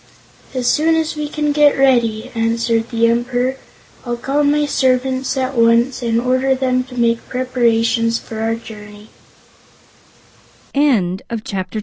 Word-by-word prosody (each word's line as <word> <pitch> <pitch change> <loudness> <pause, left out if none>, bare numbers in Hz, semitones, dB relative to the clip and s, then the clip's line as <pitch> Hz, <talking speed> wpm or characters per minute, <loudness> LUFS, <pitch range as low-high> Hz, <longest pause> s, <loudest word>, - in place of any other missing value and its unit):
"As 255 -1 -2
soon 320 +5 +3
as 320 0 -1
we 300 -1 -4
can 300 -1 -1
get 290 0 +4
ready," 240 -3 +2
answered 230 0 0
the 230 -1 +1
Emperor. 245 +2 0 0.5
"I'll 240 -1 -3
call 275 +4 -1
my 295 +1 +2
servants 260 -1 0
at 260 0 -1
once 235 +3 +3
and 230 -1 0
order 255 +2 +1
them 255 -1 0
to 255 -1 -12
make 235 0 0
preparations 230 -2 +1
for 220 -2 -8
our 225 +1 0
journey." 210 -2 -12
250 Hz, 125 wpm, -17 LUFS, 230-265 Hz, 0.5 s, get